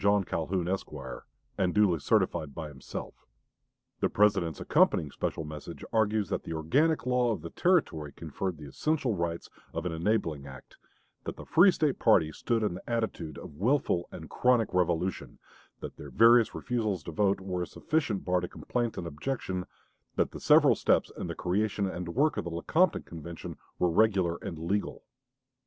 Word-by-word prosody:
Calhoun, 85 +2 -2
Esq.," 95 +1 -2 0.7
and 90 0 +1
"duly 100 -6 +4
certified 85 -5 0
by 75 - -5
himself." 70 -2 -9 0.7
The - - +1
President's 95 -7 +2
accompanying 75 -3 +2
special - - -3
message 75 -1 -8
argues 110 -3 +2
that - - -1
the 85 - -6
organic 140 - +2
law 125 -1 +2
of 110 - -3
the 85 - -7
Territory 90 - +1
conferred 85 +4 -4
the 75 - -10
essential 140 - 0
rights 85 -2 -3 0.3
of 80 +1 -3
an 90 - -1
enabling 80 -5 -1
act; 65 -2 -12 0.5
that - - -4
the - - -10
free 180 +4 +6
State 155 -6 +1
party 90 -9 +4
stood 115 +7 -1
in 105 - 0
the 90 - -9
attitude 110 -10 -2
of 75 - -10
willful 110 -6 +1
and 80 - -8
chronic 125 -4 +2
revolution; 90 0 0 0.4
that - - -7
their - - -9
various 115 0 +5
refusals 110 -8 -2
to 85 - -6
vote 100 +3 +2
were 95 -1 -3
a 90 - -2
sufficient 145 -11 -1
bar 90 0 +2
to 90 - -4
complaint 120 +3 -3
and 85 - -4
objection; 90 - -3 0.5
that - - +1
the - - -8
several - - +6
steps - - +2
in - - -5
the - - -4
creation 100 +2 0
and 90 -1 -5
work 150 +4 +2
of - - -1
the 85 - -4
Lecompton 160 - +1
Convention 85 0 -8 0.2
were 90 - +2
regular 95 -3 +3
and 100 -7 -5
legal. 95 +6 -2
95 Hz, 170 wpm, -29 LUFS, 85-115 Hz, 0.7 s, free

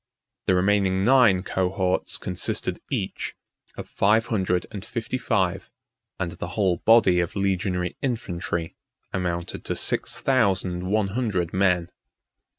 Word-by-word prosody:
The 95 - +4
remaining 95 0 +2
nine 120 -8 +5
cohorts 95 -1 -1
consisted 90 -1 -3
each - - -3 0.4
of - - -6
five 110 +3 +2
hundred 95 -5 0
and 100 -3 -6
fifty 120 +1 -4
five; 95 -5 0 0.5
and 90 -3 -2
the 85 - -6
whole 95 -4 +2
body 110 -6 +5
of 85 -1 -2
legionary 95 -2 -1
infantry 85 -9 -3 0.4
amounted 85 -2 -3
to - - -2
six - - 0
thousand 95 -8 +1
one 105 -1 +1
hundred 95 -7 -1
men. 90 -2 +2
95 Hz, 125 wpm, -25 LUFS, 90-105 Hz, 0.5 s, nine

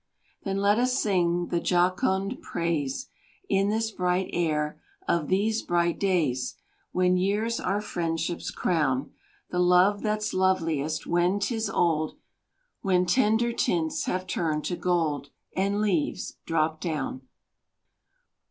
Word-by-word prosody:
Then 195 -1 -2
let 200 +2 +3
us 250 +1 +2
sing 175 -3 +1
the 170 - +2
jocund 190 - +1
praise, 170 - -2 0.4
In 195 +1 +2
this 225 +1 0
bright 180 -1 0
air, 150 -3 -1 0.3
of 165 -4 +1
these 215 +4 +1
bright 170 -1 0
days, 160 -10 0 0.4
When 180 0 +3
years 210 +5 0
our 200 +3 0
friendships 170 -3 -2
crown; 150 -5 0 0.4
The 180 - 0
love 180 +3 +4
that's 215 0 -1
loveliest 165 -5 +1
when 175 +3 +2
'tis 220 +1 -1
old 160 -4 +1 0.6
When 180 -2 +2
tender 235 +2 +2
tints 165 -7 0
have 185 0 -2
turned 160 -4 -1
to 175 - -1
gold 160 -6 0 0.3
And 200 +2 +1
leaves 185 -8 -1
drop 160 -1 0
down. 150 -6 -3
180 Hz, 125 wpm, -27 LUFS, 165-200 Hz, 0.6 s, love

